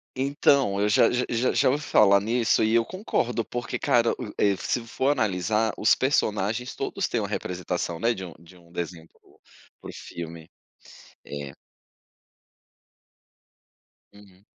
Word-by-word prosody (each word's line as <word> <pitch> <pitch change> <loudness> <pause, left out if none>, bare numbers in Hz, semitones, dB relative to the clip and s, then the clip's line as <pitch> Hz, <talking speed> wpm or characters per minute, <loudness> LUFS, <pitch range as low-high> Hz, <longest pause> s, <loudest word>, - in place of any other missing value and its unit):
Então, 135 -5 +2
eu 105 +1 +1
já - - +5
já 125 +1 0
já 120 +2 +1
já - - +3
ouvi 145 +3 -1
falar 100 -7 +5
nisso, 115 +1 +1
e 110 +1 +2
eu 115 -1 +4
concordo, 125 - -2
porque 120 +1 -4
cara, 120 -1 +2
u 110 -5 -6
e 100 -1 +3
se 115 -2 -2
for 130 +4 -1
analisar, 110 -3 +1
os 105 - +5
personagens 115 -3 0
todos - - -2
têm - - -1
uma - - -3
representação, 90 -2 -3
né, 115 +5 +2
de 95 - -7
um 85 - -11
de 85 +2 -17
um 85 -1 -21
desenho 85 -1 -6
para - - -31
o - - -24 0.4
para - - -10
o - - -7
filme. 85 -1 -9 0.8
É. 70 -1 -7 2.6
Uhum. 100 -1 -19
105 Hz, 155 wpm, -25 LUFS, 90-120 Hz, 2.6 s, já